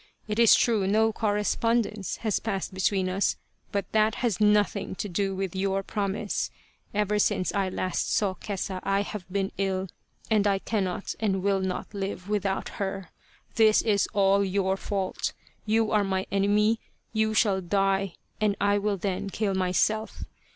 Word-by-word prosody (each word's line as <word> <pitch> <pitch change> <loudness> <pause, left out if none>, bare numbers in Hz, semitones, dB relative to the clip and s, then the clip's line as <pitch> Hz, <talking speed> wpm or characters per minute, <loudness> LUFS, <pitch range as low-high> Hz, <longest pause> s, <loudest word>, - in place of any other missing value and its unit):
It 210 +1 -2
is 230 -2 +8
true 215 -5 +2
no 220 +2 +3
correspondence 215 0 0
has 215 - +1
passed 195 -4 -3
between 190 0 +1
us, 190 +2 +1 0.4
but 200 -1 -1
that 220 0 +3
has 225 -5 -1
nothing 210 -2 +2
to 205 - -3
do 195 +1 -1
with 190 -1 -3
your 195 0 0
promise. 205 +1 -2 0.4
Ever 210 0 +1
since 185 -2 +1
I 195 -2 0
last 185 -1 -2
saw 205 -4 +2
Kesa 190 0 -4
I 195 +1 +1
have 195 -3 -7
been 195 0 -1
ill, 190 -1 -1 0.4
and 210 -2 +4
I 200 -1 +3
cannot 195 -2 -2
and 195 -4 0
will 200 -1 +2
not 190 +2 -3
live 195 -2 -4
without 200 -2 -1
her. 195 -3 -3 0.5
This 220 -1 +5
is 205 -3 +2
all 200 0 +3
your 190 0 +1
fault. 195 -1 -2 0.3
You 220 0 +2
are 210 -1 +3
my 190 -1 -1
enemy, 210 +3 +2 0.3
you 220 0 +1
shall 200 -3 +3
die! 195 0 +1 0.3
and 210 -2 +2
I 205 0 +3
will 205 0 0
then 190 +1 -2
kill 200 0 -1
myself. 190 +4 0
200 Hz, 160 wpm, -27 LUFS, 190-210 Hz, 0.5 s, is